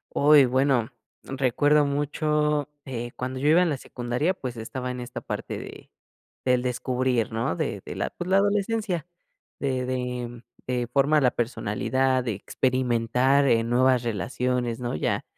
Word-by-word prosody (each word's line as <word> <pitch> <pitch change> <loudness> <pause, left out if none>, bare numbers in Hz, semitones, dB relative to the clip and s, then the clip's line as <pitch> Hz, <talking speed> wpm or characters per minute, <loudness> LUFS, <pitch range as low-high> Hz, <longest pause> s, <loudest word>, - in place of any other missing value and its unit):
Uy, 145 -1 +7
bueno 130 -1 +2 0.3
recuerdo 140 +3 +2
mucho, 150 +1 0 0.2
eh, 120 -2 -5
cuando 130 +1 -4
yo 145 - +2
iba 170 +3 +6
en 170 - +2
la 145 - -1
secundaria 125 +10 -2
pues 125 -8 -6
estaba 125 +3 -5
en 125 0 -5
esta 120 0 -7
parte - - -5
de - - -10 0.5
del 125 -1 +2
descubrir, 125 -2 0
¿no? 110 -6 -1
De - - -2
de - - -6
la, - - -2
pues, 175 - -6
la 190 - +4
adolescencia, 200 -3 0 0.5
de 130 -2 -1
de 125 -2 -4 0.2
de 125 -1 -1
formar 145 +2 +3
la 125 - +4
personalidad, 130 +3 0
de 115 - -1
experimentar, 125 +4 +1
eh, 115 -1 +3
nuevas 125 +1 +3
relaciones, 120 +2 -2
¿no? 120 -1 -3
Ya, - - -1
130 Hz, 150 wpm, -25 LUFS, 120-145 Hz, 0.5 s, Uy